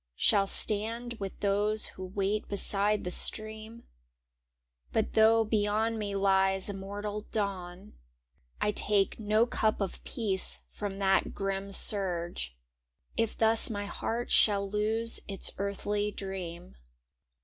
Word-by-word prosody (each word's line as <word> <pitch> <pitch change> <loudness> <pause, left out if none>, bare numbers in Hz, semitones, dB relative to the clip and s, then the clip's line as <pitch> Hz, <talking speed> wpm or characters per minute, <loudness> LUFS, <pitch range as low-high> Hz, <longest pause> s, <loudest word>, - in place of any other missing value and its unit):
Shall 195 - +2
stand 225 +5 0
with 195 -1 -6
those 210 +2 +1
who 185 - -9
wait 195 +3 -2
be 205 - -4
side 205 +2 +2
the 180 - -4
stream; 220 +3 +2 1.1
But - - -1
though 225 +1 +5
beyond 215 +1 0
me 200 -1 -3
lies 195 0 +2
immortal 205 +2 -6
dawn, 190 -4 -4 0.7
I 210 - +1
take 205 0 0
no 215 +1 +2
cup 220 -2 0
of 195 -3 -4
peace 200 -5 -1
from 200 -2 -5
that 195 -1 +1
grim 195 0 -3
surge 175 - +2 0.6
If 225 -1 -1
thus 225 0 +4
my 205 -2 -4
heart 230 +3 -4
shall 200 -2 +4
lose 220 +3 +1
its 195 -2 -1
earthly 205 +1 -2
dream. 180 - -7
205 Hz, 125 wpm, -29 LUFS, 195-215 Hz, 1.1 s, though